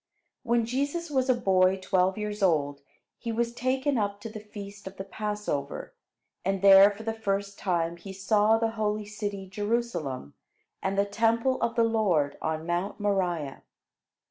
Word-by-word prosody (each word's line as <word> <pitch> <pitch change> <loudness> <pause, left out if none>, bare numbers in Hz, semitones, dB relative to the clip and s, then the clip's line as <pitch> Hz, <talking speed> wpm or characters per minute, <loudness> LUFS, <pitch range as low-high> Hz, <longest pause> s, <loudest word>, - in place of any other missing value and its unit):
When 235 -2 +1
Jesus 285 +7 -2
was 260 -2 +1
a 255 - +5
boy 190 -4 +3
twelve 185 0 +1
years 210 0 -4
old, 145 -6 +2 0.4
he 230 - -3
was 235 +1 -1
taken 260 +2 0
up 200 -1 -1
to 225 - -6
the 215 0 -7
feast 205 -1 -10
of 190 - -9
the 195 - -4
Passover, 210 -9 -4 0.5
and 195 +1 -1
there 195 0 +9
for 205 +2 -8
the 225 0 -2
first 200 -2 -2
time 170 -2 0
he 195 +3 -9
saw 210 +3 +3
the 225 0 0
holy 215 -1 -1
city 205 -2 -5
Jerusalem, 195 - -2 0.5
and 195 - -1
the 200 - +3
Temple 230 +5 +1
of 230 - 0
the 230 - +4
Lord 200 -11 +2
on 160 0 -2
Mount 175 +5 -2
Moriah. 180 -8 -1
205 Hz, 165 wpm, -28 LUFS, 190-225 Hz, 0.5 s, there